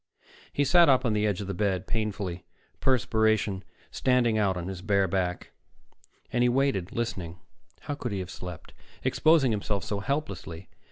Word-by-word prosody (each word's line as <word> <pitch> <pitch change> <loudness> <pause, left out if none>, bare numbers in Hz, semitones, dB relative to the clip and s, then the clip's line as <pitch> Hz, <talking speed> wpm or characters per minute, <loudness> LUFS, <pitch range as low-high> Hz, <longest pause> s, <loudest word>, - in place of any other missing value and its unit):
He 145 - +1
sat 170 +3 +6
up 130 -2 +4
on 115 - +2
the 105 0 +2
edge 105 -2 -1
of - - -4
the 100 - -2
bed, 95 -2 0
painfully, 100 -6 -3 0.4
perspiration 110 -6 +2 0.3
standing 125 -3 +2
out 100 -4 +1
on 90 0 -4
his 95 -2 -5
bare 100 -1 +2
back, 90 -1 -2 0.8
and 120 - +2
he 125 - +4
waited, 120 -8 +1
listening. 95 -8 -3 0.4
How - - -4
could 130 -5 -4
he 100 - -2
have 95 0 -5
slept, 90 -4 -8 0.3
exposing 155 -6 +4
himself 100 -2 -1
so 100 - -3
helplessly? 100 - -4
105 Hz, 165 wpm, -28 LUFS, 95-125 Hz, 0.8 s, sat